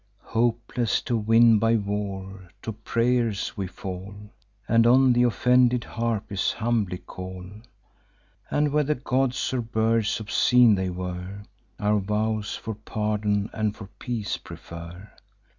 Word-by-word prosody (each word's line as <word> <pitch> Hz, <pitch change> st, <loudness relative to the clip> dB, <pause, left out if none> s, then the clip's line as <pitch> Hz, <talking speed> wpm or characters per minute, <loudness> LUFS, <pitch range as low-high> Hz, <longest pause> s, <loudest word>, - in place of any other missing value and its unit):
Hopeless 115 Hz, 0 st, +1 dB
to 120 Hz, -, -1 dB
win 115 Hz, 0 st, +5 dB
by 115 Hz, +2 st, +3 dB
war, 100 Hz, -3 st, -4 dB
to 115 Hz, -, -3 dB
pray'rs 115 Hz, 0 st, 0 dB
we 100 Hz, -4 st, -3 dB
fall, 95 Hz, +2 st, -7 dB, 0.5 s
And 115 Hz, +1 st, +4 dB
on 130 Hz, +1 st, +6 dB
th' 120 Hz, 0 st, +3 dB
offended 125 Hz, 0 st, +3 dB
Harpies 110 Hz, -4 st, -2 dB
humbly 110 Hz, -5 st, -1 dB
call, 90 Hz, 0 st, -8 dB, 1.0 s
And 150 Hz, 0 st, +1 dB
whether 150 Hz, 0 st, +1 dB
gods 130 Hz, 0 st, -1 dB
or 125 Hz, -, 0 dB
birds 115 Hz, -1 st, 0 dB
obscene 115 Hz, +2 st, +4 dB
they 95 Hz, -2 st, 0 dB
were, 90 Hz, +2 st, -6 dB, 0.4 s
Our 105 Hz, 0 st, +2 dB
vows 105 Hz, +1 st, -1 dB
for 110 Hz, -, -5 dB
pardon 105 Hz, -1 st, -1 dB
and 110 Hz, -1 st, -1 dB
for 100 Hz, -3 st, -10 dB
peace 110 Hz, -6 st, -3 dB
prefer. 85 Hz, +4 st, -10 dB
110 Hz, 125 wpm, -25 LUFS, 100-120 Hz, 1.0 s, on